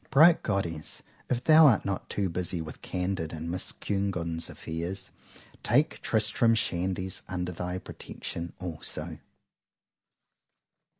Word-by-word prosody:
Bright 160 +4 +7
Goddess, 85 -7 -2 0.3
If 125 -1 0
thou 160 0 +8
art 115 -7 +4
not 95 -1 -2
too 100 -2 0
busy 90 0 -2
with 80 -2 -7
CANDID 90 -3 -2
and 80 +1 -4
Miss 90 +1 0
CUNEGUND'S 90 -5 -2
affairs,—take 95 - -2
Tristram 115 +1 +3
Shandy's 95 -3 -1
under 90 -1 -2
thy 90 +1 -3
protection 85 -2 -6
also. 85 -4 -4
90 Hz, 110 wpm, -29 LUFS, 85-105 Hz, 0.3 s, thou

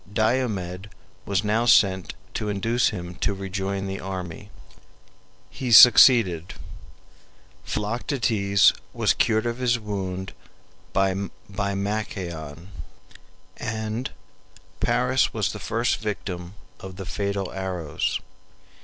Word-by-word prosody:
Diomed 105 -5 -1 0.4
was 100 0 0
now 110 +3 +1
sent 95 - +3 0.2
to 105 - -3
induce 115 +4 +1
him 90 0 -6
to 100 - -1
rejoin 95 0 -3
the 95 0 -4
army. 95 0 -6 1.0
He 130 - -4
sukcceeded. 110 - +7 1.1
Philoctetes 105 -2 +1 0.2
was - - +2
cured 110 0 +1
of 120 +1 -2
his 120 -1 +2
wound 95 -4 -5 0.6
by 95 0 +2 0.3
Machaon, 100 -5 -4 0.9
and 110 +2 -3 0.7
Paris - - +1
was - - 0
the - - -7
first 115 +2 0
victim 95 -4 -5 0.2
of 95 -1 -9
the 95 0 -7
fatal 100 0 -3
arrows. 90 -5 -2
100 Hz, 100 wpm, -24 LUFS, 95-110 Hz, 1.1 s, sukcceeded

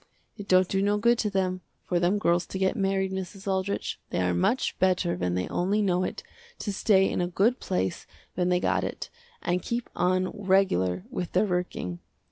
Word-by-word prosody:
It 205 -3 -9
don't 185 0 +5
do 195 +1 0
no 205 +1 +2
good 235 +2 +3
to 210 - +1
them, 185 -2 -1 0.2
for 175 - +1
them 175 +4 +2
girls 175 -4 +1
to - - -5
get 190 0 +1
married 195 -1 0
Mrs. 190 +2 -6
Aldrich, 190 +1 -1
they - - -2
are 90 -1 +1
much 220 - 0
better 185 -2 +2
when 90 0 -1
they 90 0 -1
only 195 +4 0
know 185 -3 +2
it, - - -4 0.3
to 205 - -4
stay 195 -1 +4
in - - -1
a 175 - 0
good 205 +8 +2
place 95 0 -2 0.3
when 180 0 0
they 180 0 +3
got - - +1
it, - - -5 0.3
and 180 +1 0
keep 235 0 -3
on 185 +1 +1
regular 185 - +1
with 180 - -4
their 185 +4 +3
working. 180 - -3
185 Hz, 200 wpm, -27 LUFS, 175-200 Hz, 0.3 s, don't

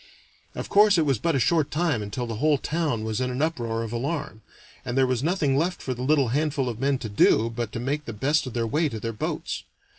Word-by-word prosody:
Of - - -4
course 205 -1 +5
it 160 - +3
was 135 -6 +1
but 165 +3 +1
a - - +2
short 155 +4 +2
time 155 -7 0
until 105 +4 -4
the 115 -2 -5
whole 150 +4 +3
town 150 -6 -1
was 110 +2 -2
in 125 - 0
an 125 +1 -3
uproar 120 -8 -1
of 115 0 -6
alarm, 135 -2 -3 0.4
and 120 - -3
there 135 - +5
was 125 -2 0
nothing 155 -3 +1
left 175 +6 0
for 130 - -3
the 125 - -7
little 140 -1 +2
handful 145 0 0
of 120 -2 -4
men 135 +1 +1
to 125 - -6 0.2
do 115 +1 +2
but 115 -1 -4
to - - -3
make 145 +5 -2
the - - -5
best 140 +7 +1
of 125 - -6
their 115 -1 0
way 150 +8 +1
to 110 - -5
their 115 +1 -4
boats. 105 - -4
130 Hz, 250 wpm, -25 LUFS, 115-155 Hz, 0.4 s, course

